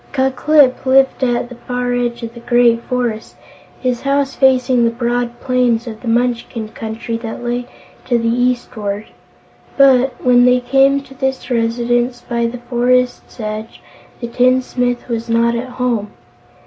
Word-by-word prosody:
Ku 265 -1 +1
Klip 285 -1 +3
lived 265 0 +3
at 240 -1 0
the - - -9
far 245 0 -1
edge 240 -1 -2
of 230 0 -6
the 235 - -11
great 235 -1 +3
forest, 240 -3 -3 0.5
his 250 -2 -1
house 275 0 0
facing 255 -2 +3
the 230 - +3
broad 240 0 -2
plains 250 -2 +1
of 220 -2 -8
the 250 - -8
Munchkin 235 -1 -1
Country 225 +1 -5
that 230 0 -7
lay 245 0 -2 0.4
to 240 - +1
the 230 0 -1
eastward. 230 -4 -1 0.7
But, 265 -2 +4
when 245 -1 +4
they 250 0 +4
came 275 +2 +3
to 270 - -15
this 265 0 -3
residence 240 +1 0
by 235 -1 -2
the 240 +2 -6
forest's 245 +1 0
edge, 215 0 -5 0.4
the 235 - -3
tinsmith 250 0 0
was 235 -1 -4
not 230 +1 +2
at 240 +2 -4
home. 245 -5 -2
245 Hz, 155 wpm, -17 LUFS, 235-255 Hz, 0.7 s, But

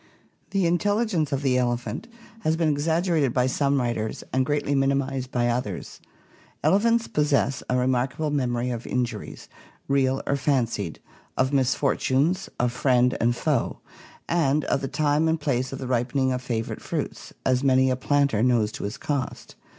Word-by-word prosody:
The 195 -3 +1
intelligence 185 -2 +1
of 140 0 -1
the 130 -2 +3
elephant 120 -2 -2 0.3
has 160 -7 +1
been 165 -2 +2
exaggerated 160 -2 +1
by 125 -1 +3
some 140 +2 +1
writers 120 -3 -2
and 130 0 +3
greatly 145 -1 0
minimized 135 -1 0
by 120 -1 +1
others. 120 -6 -3 0.6
Elephants 225 +8 +3
possess 145 -2 +1
a 125 - +2
remarkable 130 +4 0
memory 125 -3 0
of 120 -1 -5
injuries, 120 -4 -3 0.4
real 135 -1 +1
or 140 - +1
fancied; 120 - -1 0.4
of 130 +2 +1
misfortunes; 140 +5 +1
of 120 0 +2
friend 125 0 +2
and 120 +1 +2
foe; 145 -2 0 0.5
and 150 -4 +1
of 135 - 0
the 135 - -2
time 150 +2 +1
and 160 0 +1
place 130 -4 -1
of 135 - -5
the 130 - -6
ripening 130 +2 0
of 125 0 -2
fa 120 -3 -2
vorite - - -7
fruits, - - -4
as 130 0 +2
many 130 -1 +4
a - - +2
planter 140 -4 +1
knows 115 -3 +2
to - - -6
his 100 - -4
cost. 140 -3 -4
135 Hz, 160 wpm, -25 LUFS, 125-145 Hz, 0.6 s, many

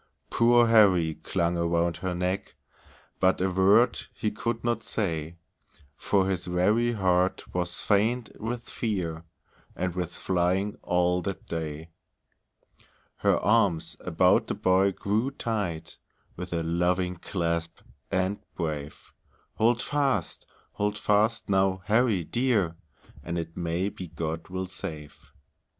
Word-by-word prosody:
Poor 120 0 +5
Harry 95 -8 +5
clung 85 +1 -1
around 85 0 +1
her 95 -2 -3
neck, 90 +2 -2 0.6
But 95 0 +3
a 95 +1 +1
word 100 +6 +4 0.2
he 105 - -1
could 115 +2 -3
not 120 0 0
say, 85 -5 -2 0.6
For 95 +3 +1
his 95 -2 -1
very 105 +7 +2
heart 95 -3 +1
was 90 0 -2
faint 110 +4 +1
with 120 +2 -3
fear, 85 -8 -3 0.5
And 90 -1 -2
with 90 -1 -3
flying 95 +3 0
all 90 0 +1
that 95 +1 -5
day. 80 0 -5 1.3
Her - - +3
arms 90 -7 +2
about 90 +1 +3
the - - -2
boy 95 +1 +3
grew 105 +7 -1
tight, 105 - -4 0.4
With 90 +1 -7
a 85 -1 -1
loving 90 +2 0
clasp, 85 -2 -3 0.3
and 95 +2 0 0.2
brave; 75 -3 -5 0.4
"Hold 120 +2 +3
fast! 135 - -1 0.2
Hold 105 0 -1
fast, 105 +2 +2
now, 95 -2 +1
Harry 110 -3 +2
dear, 105 -4 +1 0.5
And 85 +1 -3
it 85 -1 -5
may 85 +2 -1
be 95 -3 -8
God 80 0 -4
will 95 0 -3
save." 85 -5 -7
95 Hz, 125 wpm, -27 LUFS, 85-105 Hz, 1.3 s, Poor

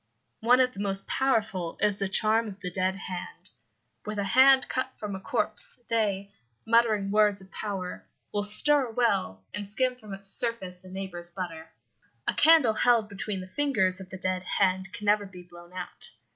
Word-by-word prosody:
One 245 +3 +4
of 255 -1 +2
the - - -10
most 195 -1 -2
powerful 210 -10 -1
is 205 -1 +1
the 195 -1 -2
charm 220 +3 +2
of 200 -1 -9
the 180 -3 -6
dead 185 +1 -1
hand. 185 -2 -8 0.5
With 215 0 -5
a 200 - 0
hand 260 +6 +5
cut 255 0 -2
from 205 -2 -5
a - - -6
corpse 485 - +2
they, 200 -3 0 0.3
muttering 220 -3 +2
words 210 -1 +3
of 190 0 -12
power, 195 -4 -5 0.3
will 205 - 0
stir 275 +7 +5
a - - -9
well 95 - 0
and 205 0 -5
skim 255 +4 0
from 215 -5 -9
its 195 0 -10
surface 190 -7 -1
a 185 - -13
neighbour's 185 -2 -6
butter. 165 -3 -7 0.6
A - - +2
candle 315 -8 +5
held 230 -1 +2
between 200 -1 -5
the 185 - -9
fingers 195 -6 +1
of 190 -1 -10
the 190 - -8
dead 185 0 -2
hand 190 0 0
can 210 - -7
never 205 0 +2
be 180 -2 -12
blown 175 0 -15
out. 185 - -3
200 Hz, 185 wpm, -27 LUFS, 185-225 Hz, 0.6 s, hand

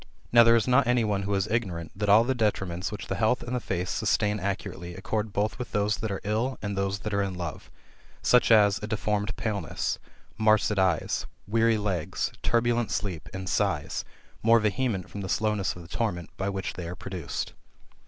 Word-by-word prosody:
Now 120 - +8
there 115 0 +6
is 115 0 +2
not 125 0 +4
any 125 -1 +3
one 105 -2 0
who 100 +1 -1
is 95 0 +1
ignorani, 90 -8 -2
that 105 +1 -1
all 105 +3 +7
the 130 +2 +1
detriments 95 -6 -1
which 105 - -6
the - - -3
health 110 +3 +2
and 125 +1 -3
the - - 0
face 90 -4 -2
sustain 105 -1 +1
accurately 95 -2 -4
accord 105 +3 -2
both 105 +4 -1
with 125 - -6
those 105 +1 +1
that 110 - -3
are 100 - -2
ill, 110 +6 -1
and 100 -1 -3
those 100 0 0
that 105 - -4
are 100 - +2
in 95 -2 -2
love; 85 -3 -6 0.5
such 125 -1 +5
as, 105 -3 +6
a 105 - -4
deformed 105 -2 -1
paleness, 100 -6 -2 0.4
marcid 110 -1 +3
eyes, 95 -4 +1 0.2
weary 115 +1 +3
legs, 95 -6 -1
turbulent 120 0 +1
sleep, 95 -5 -3
and 95 0 -6
sighs, 85 - 0 0.4
more 115 +1 +6
vehement 105 -3 0
from 100 - -7
the 95 - -5
slowness 105 -3 0
of 90 - -9
the - - -12
torment 90 -4 -3
[by 95 +1 -2
which 95 -1 -3
they 85 -2 -6
are 90 - -5
produced]. 90 -6 -5
105 Hz, 200 wpm, -27 LUFS, 95-110 Hz, 0.5 s, Now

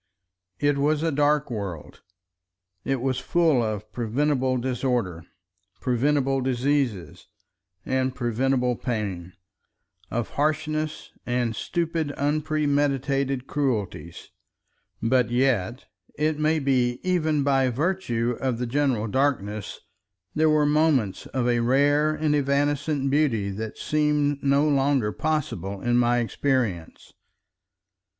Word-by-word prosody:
It 145 -1 +1
was 150 +2 +1
a 165 - +1
dark 145 -1 +1
world; 100 -8 -6 0.8
it 135 -2 -1
was 130 -1 0
full 155 0 +2
of 110 -1 -4
preventable 130 +3 0
disorder, 120 -9 -2 0.5
preventable 135 +2 +1
diseases, 125 - -1 0.6
and 130 0 0
preventable 125 +1 0
pain, 100 -8 -4 0.8
of 120 -1 -2
harshness 155 +1 -2
and 120 -2 -1
stupid 165 -2 -2
unpremeditated 145 -3 0
cruelties; 105 - -3 0.7
but 125 0 +2
yet, 120 -2 0 0.3
it 155 0 0
may 155 +1 +2
be 125 -4 +1
even 160 -5 +1
by 135 -2 +2
virtue 125 -5 -1
of 130 -3 0
the 125 - -2
general 130 -3 0
darkness, 110 -5 -1 0.5
there 155 +1 +3
were 155 -1 +3
moments 145 -9 +1
of 130 -2 -1
a 120 -1 +2
rare 145 +5 +3
and 155 -1 0
evanescent 145 0 0
beauty 120 -9 +1
that 110 +2 -6
seem 150 -1 +1
no 140 +2 +3
longer 135 -6 +2
possible 115 - -2
in 120 +4 0
my 120 0 +3
experience. 120 - -2
135 Hz, 110 wpm, -25 LUFS, 120-145 Hz, 0.8 s, there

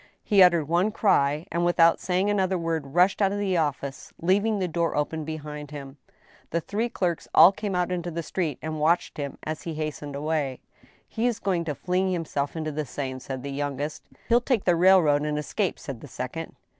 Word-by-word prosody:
He 200 -2 +4
uttered 170 -5 +5
one 175 +6 +2
cry, 150 -8 +2
and, 170 +1 0
without 170 -1 +4
saying 185 +2 0
another 190 -2 +1
word, 160 -4 -3
rushed 180 +4 +4
out 195 -1 +3
of 200 - -2
the 200 -2 0
office, 140 -4 -2
leaving 205 +5 +2
the 185 -2 -1
door 170 0 -1
open 155 +2 -1
behind 150 -2 -6
him. 140 -1 -9 0.5
The 170 - 0
three 215 +8 -2
clerks 180 -7 -2
all 165 +4 +9
came 200 -1 -4
out 180 0 0
into 175 -1 -2
the 170 0 -4
street, 160 -5 -2
and 155 0 -3
watched 165 +3 +1
him 140 -2 -4
as 155 0 -4
he 165 -2 -5
hastened 150 -2 -4
away. 145 -3 -2 0.2
" 130 - -32
He 230 +2 -1
is 240 -3 0
going 185 -6 -1
to 150 -3 -3
fling 185 +3 0
himself 155 -5 -2
into 155 -1 -3
the 155 +1 -2
Seine," 130 -1 -5
said 130 0 -6
the 140 - -5
youngest. 145 +1 -3
" - - -29
He'll 240 +1 +4
take 240 -4 0
the 175 - +3
railroad, 170 -5 +5
and 150 0 -1
escape," 150 - -1
said - - -8
the - - -9
second. - - -6
165 Hz, 210 wpm, -26 LUFS, 150-185 Hz, 0.5 s, all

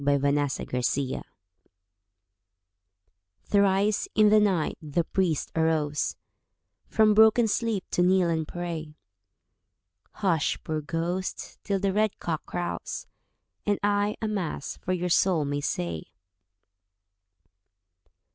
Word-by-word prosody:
THE 140 0 +3 0.5
PRIEST'S 125 -1 0
BROTHER 135 -2 -2 2.2
Thrice 200 +1 +2
in 215 -1 +6
the 215 +1 +6
night 190 -7 +1
the 155 +2 -1
priest 175 -3 -1
arose 155 -2 0 0.7
From 215 -1 +4
broken 220 +2 +6
sleep 220 -2 0
to - - +1
kneel 180 0 +4
and 160 -2 -1
pray. 165 -3 -5 1.2
"Hush, 170 -7 +1
poor 155 -1 -2
ghost, 170 +4 -4
till 200 -1 0
the 195 0 0
red 215 0 +1
cock 160 -3 -4
crows, 175 -1 -4 0.6
And 205 -1 +1
I 205 0 +1
a - - +1
Mass 185 -9 -3
for 185 - -3
your 180 0 -1
soul 175 -3 +3
may 145 0 -2
say." 85 - -3
180 Hz, 110 wpm, -27 LUFS, 155-205 Hz, 2.2 s, in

